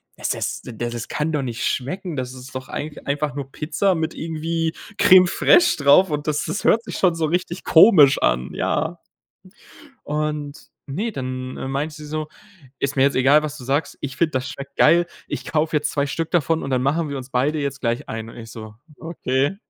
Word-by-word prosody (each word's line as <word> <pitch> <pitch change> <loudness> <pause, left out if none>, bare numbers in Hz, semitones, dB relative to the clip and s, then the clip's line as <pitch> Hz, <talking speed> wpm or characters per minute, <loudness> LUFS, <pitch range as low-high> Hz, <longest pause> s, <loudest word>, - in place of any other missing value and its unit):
„Es - - -2
es - - -3
da - - -8 0.2
das 120 -1 -5
kann 150 +2 -1
doch 145 -3 -1
nicht 120 -2 -4
schmecken. 165 +6 -3
Das 130 -1 -4
ist 130 0 -11
doch 130 0 -6
eigentlich 150 0 -6
einfach 145 -1 -2
nur 135 -1 -6
Pizza 185 +5 0
mit 160 -1 -2
irgendwie 165 0 -2 0.2
Crème 185 -1 +7
Fraîche 350 - +4
drauf, 160 +6 +6
und 150 0 -3
das 150 -1 0
das 200 - -3
hört 230 +1 +3
sich - - -6
schon 180 -3 +3
so 160 -1 0
richtig 175 +2 -2
komisch 160 -6 +7
an.“ - - 0
Ja. 165 +3 -1 1.0
Und 150 0 -3 0.2
ne, 205 +12 -3
dann, 130 -1 -5
äh, - - -5
meinte 150 +3 -2
sie 150 -1 -10
so: 155 0 -3 0.5
„Ist 140 +1 -2
mir 135 - +5
jetzt 140 - +3
egal, 140 +4 +5
was 150 0 -5
du 125 - -10
sagst. 140 +3 -1
Ich 135 -1 -5
finde, 165 -2 +2
das 130 0 -2
schmeckt 140 -2 -9
geil, 170 +1 +5 0.2
ich - - -5
kaufe 155 0 +1
jetzt 150 - -2
2 140 -1 0
Stück 165 +3 -3
davon, 165 -1 +1
und 135 - -4
dann 125 -1 +1
machen 150 +4 0
wir 140 - -4
uns 130 0 -8
beide 140 +5 0
jetzt 140 -1 -3
gleich 120 +3 -2
einen.“ 110 0 -5
Und - - -13
ich 115 -1 -9
so: 110 -3 -9 0.3
„Okay, 145 -1 -1
145 Hz, 210 wpm, -22 LUFS, 130-160 Hz, 1.0 s, Crème